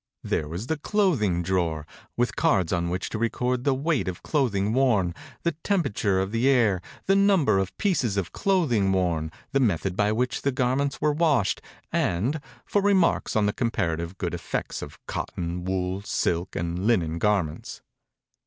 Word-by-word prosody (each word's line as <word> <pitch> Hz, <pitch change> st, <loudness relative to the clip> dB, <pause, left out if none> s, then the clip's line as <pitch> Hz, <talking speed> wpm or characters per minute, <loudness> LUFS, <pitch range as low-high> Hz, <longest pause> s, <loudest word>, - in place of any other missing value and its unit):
There 75 Hz, -, -1 dB
was 85 Hz, +8 st, -5 dB
the 160 Hz, +3 st, -2 dB
clothing 145 Hz, -, +1 dB
drawer, 85 Hz, -4 st, 0 dB, 0.3 s
with 120 Hz, 0 st, 0 dB
cards 90 Hz, -4 st, +2 dB
on 85 Hz, -1 st, 0 dB
which 90 Hz, +1 st, -2 dB
to 110 Hz, -, -3 dB
record 125 Hz, +2 st, -1 dB
the 140 Hz, -2 st, +3 dB
weight 145 Hz, -, 0 dB
of 90 Hz, -1 st, -5 dB
clothing 110 Hz, -8 st, +1 dB
worn, 115 Hz, -9 st, +2 dB, 0.3 s
the 170 Hz, -, +2 dB
temperature 105 Hz, -, +1 dB
of 95 Hz, +1 st, -1 dB
the 115 Hz, +4 st, +2 dB
air, 110 Hz, -9 st, +3 dB, 0.2 s
the 195 Hz, -, +3 dB
num 195 Hz, -5 st, +4 dB
ber 105 Hz, -5 st, +3 dB
of 95 Hz, -1 st, -3 dB
pieces 135 Hz, -, +1 dB
of 90 Hz, -5 st, -1 dB
clothing 135 Hz, -, +2 dB
worn, 85 Hz, -4 st, 0 dB, 0.2 s
the 135 Hz, -, +2 dB
method 95 Hz, -6 st, +1 dB
by 105 Hz, +1 st, +2 dB
which 125 Hz, +3 st, -1 dB
the 140 Hz, -, +1 dB
gar 130 Hz, -1 st, +1 dB
ments 140 Hz, 0 st, -1 dB
were 150 Hz, -1 st, +3 dB
washed, 145 Hz, -, +2 dB, 0.3 s
and 120 Hz, -, 0 dB, 0.2 s
for 205 Hz, -, +1 dB
re 200 Hz, 0 st, +4 dB
marks 185 Hz, -3 st, +2 dB
on 110 Hz, -1 st, +3 dB
the 105 Hz, -, +1 dB
comparative 90 Hz, -7 st, -2 dB
good 90 Hz, -2 st, -3 dB
effects 85 Hz, -1 st, -4 dB
of 75 Hz, +1 st, -8 dB
cotton, 85 Hz, +1 st, -4 dB
wool, 95 Hz, 0 st, -1 dB
silk, 90 Hz, -3 st, -1 dB
and 85 Hz, +4 st, -2 dB
linen 85 Hz, -8 st, +1 dB
garments. 95 Hz, -6 st, -1 dB
105 Hz, 175 wpm, -26 LUFS, 90-135 Hz, 0.3 s, num